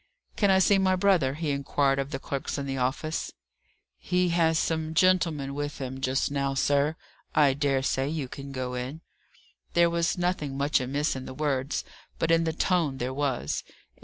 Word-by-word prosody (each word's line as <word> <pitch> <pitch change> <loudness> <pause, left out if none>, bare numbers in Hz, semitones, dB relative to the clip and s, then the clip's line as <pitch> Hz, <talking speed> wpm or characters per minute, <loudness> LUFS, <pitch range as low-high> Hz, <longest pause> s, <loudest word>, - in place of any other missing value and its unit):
"Can 205 - +2
I 190 - +5
see 195 +1 +4
my 190 -1 +3
brother?" 180 -8 +2
he 155 -1 -2
inquired 140 0 +1
of 135 0 -2
the 145 - -3
clerks 135 +1 -4
in 140 - -3
the 135 -1 -3
office. 140 +5 -2 0.7
"He 180 0 +1
has 165 -1 +3
some 160 0 -1
gentlemen 165 -6 +2
with 145 +1 -4
him 130 -1 -5
just 130 +1 0
now, 140 -1 -1
sir. 145 +3 +2 0.4
I 145 -3 +5
dare 135 -1 0
say 135 +1 0
you 150 -4 -3
can 140 +2 -8
go 130 -1 -4
in." 130 +6 -5 0.7
There 170 0 +5
was 170 +2 0
nothing 175 -6 -1
much 140 0 +2
amiss 140 +4 -1
in 130 0 -6
the 130 - -8
words; 140 -2 -1 0.3
but 165 - +1
in 165 0 +4
the 160 - +1
tone 165 -5 +1
there 130 +1 -3
was. 130 - -1
145 Hz, 185 wpm, -27 LUFS, 135-165 Hz, 0.7 s, I